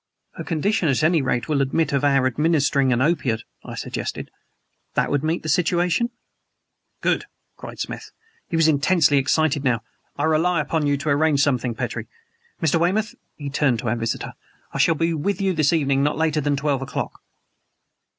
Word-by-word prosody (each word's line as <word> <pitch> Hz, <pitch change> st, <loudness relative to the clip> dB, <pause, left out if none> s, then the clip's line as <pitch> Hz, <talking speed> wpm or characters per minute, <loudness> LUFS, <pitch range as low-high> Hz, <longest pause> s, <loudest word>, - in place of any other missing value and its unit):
"Her -, -, -7 dB
condition 175 Hz, +2 st, 0 dB
at 135 Hz, +2 st, +1 dB
any 160 Hz, 0 st, +3 dB
rate 125 Hz, -2 st, -1 dB
will 150 Hz, -3 st, +1 dB
admit 140 Hz, +3 st, 0 dB
of 140 Hz, -, +1 dB
our 140 Hz, -2 st, +3 dB
administering 140 Hz, 0 st, +2 dB
an 125 Hz, +1 st, +2 dB
opiate," 130 Hz, -8 st, 0 dB, 0.2 s
I -, -, -8 dB
suggested. -, -, -5 dB, 0.6 s
"That -, -, +1 dB
would 145 Hz, 0 st, +1 dB
meet 160 Hz, +2 st, -1 dB
the -, -, -5 dB
situation?" 175 Hz, +7 st, +1 dB, 0.9 s
"Good!" -, -, +1 dB, 0.3 s
cried -, -, -10 dB
Smith. -, -, -5 dB, 0.4 s
He -, -, -2 dB
was 165 Hz, -1 st, +4 dB
intensely 150 Hz, -1 st, +3 dB
excited 145 Hz, +1 st, +1 dB
now. 120 Hz, -5 st, +1 dB, 0.3 s
"I -, -, -1 dB
rely 160 Hz, +2 st, +2 dB
upon 150 Hz, 0 st, 0 dB
you 145 Hz, 0 st, +2 dB
to 150 Hz, +2 st, -3 dB
arrange 145 Hz, 0 st, +3 dB
something, 125 Hz, -4 st, 0 dB
Petrie. -, -, -4 dB, 0.6 s
Mr. 165 Hz, +1 st, +3 dB
Weymouth" 205 Hz, +6 st, +1 dB, 0.2 s
he 145 Hz, -2 st, -6 dB
turned 135 Hz, -4 st, +2 dB
to 120 Hz, -, -3 dB
our 115 Hz, -, +1 dB
visitor 115 Hz, -1 st, -3 dB, 0.4 s
"I -, -, -3 dB
shall 165 Hz, -, +4 dB
be 165 Hz, +2 st, 0 dB
with 175 Hz, +5 st, -1 dB
you 195 Hz, -1 st, +1 dB
this 155 Hz, -2 st, +2 dB
evening 140 Hz, -4 st, +2 dB
not 145 Hz, +1 st, +1 dB
later 155 Hz, -1 st, +1 dB
than 145 Hz, 0 st, +1 dB
twelve 140 Hz, -1 st, -1 dB
o'clock." 135 Hz, -, -4 dB
150 Hz, 180 wpm, -22 LUFS, 135-165 Hz, 0.9 s, was